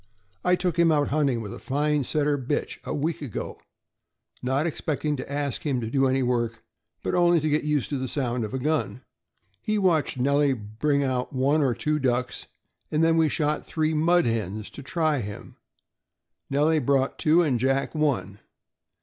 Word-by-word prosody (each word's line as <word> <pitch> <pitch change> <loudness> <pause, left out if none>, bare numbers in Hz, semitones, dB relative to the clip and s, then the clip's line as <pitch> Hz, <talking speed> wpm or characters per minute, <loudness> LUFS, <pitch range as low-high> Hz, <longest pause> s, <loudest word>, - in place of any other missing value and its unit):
" 95 - -37
I 180 0 +4
took 180 -2 -1
him 170 -1 +5
out 145 -2 +2
hunting, 140 -5 +1
with 105 -3 -6
a - - -8
fine 150 +1 0
Setter 150 +2 +1
bitch, 140 +1 -3
a - - -4
week 155 +3 -2
ago, 135 -8 -5 0.8
not 130 +4 0
expecting 155 -2 -2
to 130 - -7
ask 140 -2 -2
him 140 -5 -1
to 115 -1 -4
do 135 0 +3
any 130 0 +1
work, 120 -2 -1 0.4
but - - -2
only 175 -1 +4
to 155 - -1
get 150 +1 +1
used 150 -3 0
to 140 - -1
the 130 - -3
sound 125 -3 -1
of 105 - -4
a - - -2
gun. 145 -2 -1 0.6
He 215 0 0
watched 170 -8 +2
Nellie 140 +2 +3
bring 125 +6 -1
out 130 -1 -2
one 140 +4 +2
or 130 -4 +2
two 150 -1 0
ducks, 125 -2 -1 0.4
and 155 +1 +1
then 165 0 +4
we 160 -1 +3
shot 150 +1 0
three 160 0 -1
mud 170 +3 +3
hens, 110 -2 -2
to - - -9
try 155 +1 0
him. 105 -3 -8 0.9
Nellie 150 +3 +3
brought 135 0 +1
two, 165 +3 +4
and 135 -7 +1
Jack 135 +2 0
one. 140 - -1
140 Hz, 185 wpm, -25 LUFS, 125-155 Hz, 0.9 s, him